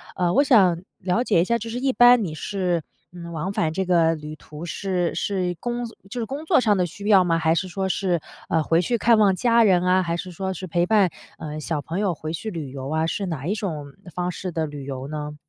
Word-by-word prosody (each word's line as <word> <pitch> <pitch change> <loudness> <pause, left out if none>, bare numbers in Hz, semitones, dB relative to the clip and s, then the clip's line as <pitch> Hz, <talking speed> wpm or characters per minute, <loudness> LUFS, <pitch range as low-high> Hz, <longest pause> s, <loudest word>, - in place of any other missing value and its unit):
呃， 175 -1 +1
我 280 - +5
想 190 -11 +4 0.2
了 185 +6 0
解 205 -9 +3
一 - - +3
下， 235 +6 +1
就 230 +1 -6
是 235 +2 -3
一 265 0 +1
般 245 -1 +6
你 165 -5 -4
是， 180 0 -1 0.3
嗯， 170 -1 -9
往 165 +4 -3
返 160 -5 0
这 190 +3 -1
个 165 -2 +3
旅 150 0 -8
途 150 +2 -10
是 180 -1 -1
是 185 -3 -1
工 240 0 -3 0.2
就 245 +4 -5
是 230 - -1
工 280 +7 -6
作 320 -2 +4
上 215 -4 +3
的 180 - +2
需 200 +5 -8
要 195 -3 +6
吗？ 165 -2 +1
还 160 0 +2
是 180 +3 -1
说 190 +1 -2
是， 180 -2 0 0.3
呃， 160 -1 +2
回 165 +3 +2
去 235 +6 0
看 230 +1 +4
望 200 -3 +4
家 235 +4 +4
人 185 -4 +4
啊， 185 +1 +3
还 170 -1 -2
是 180 +1 -6
说 190 +3 -3
是 185 - -6
陪 175 +1 +1
伴， 200 -4 +4 0.3
呃， 155 -1 -6
小 155 -1 -2
朋 165 +6 -4
友 200 -4 +1
回 155 +1 -5
去 195 +7 -4
旅 160 -9 -6
游 135 0 -6
啊， 160 +1 0
是 195 +4 -2
哪 155 -6 -4
一 195 - +1
种 155 -9 -5 0.2
方 180 +1 -2
式 185 +1 -5
的 160 -1 -1
旅 145 -2 -7
游 135 -1 -5
呢？ 150 0 -5
180 Hz, 265 characters per minute, -23 LUFS, 160-205 Hz, 0.3 s, 般